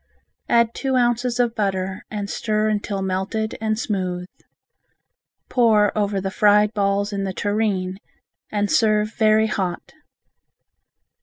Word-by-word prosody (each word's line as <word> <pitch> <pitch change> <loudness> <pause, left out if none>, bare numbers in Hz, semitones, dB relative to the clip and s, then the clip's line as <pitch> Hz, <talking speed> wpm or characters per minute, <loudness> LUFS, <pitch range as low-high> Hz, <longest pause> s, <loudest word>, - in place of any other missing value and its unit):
Add 235 -1 +3
two 265 -2 -1
ounces 245 0 +1
of 240 -2 +2
butter 190 -3 -2
and 205 -2 -4
stir 215 +1 0
until 205 -2 -2
melted 190 +4 -2
and 215 -1 0
smooth. 185 -5 -2 1.2
Pour 220 -4 +3
over 205 -2 0
the 190 0 -3
fried 210 +1 +4
balls 200 0 0
in 200 -1 -2
the 190 -1 -3
tureen 200 -2 -1 0.5
and 205 -1 -1
serve 215 -1 +2
very 220 0 +3
hot. 190 -5 -3
210 Hz, 125 wpm, -22 LUFS, 195-220 Hz, 1.2 s, fried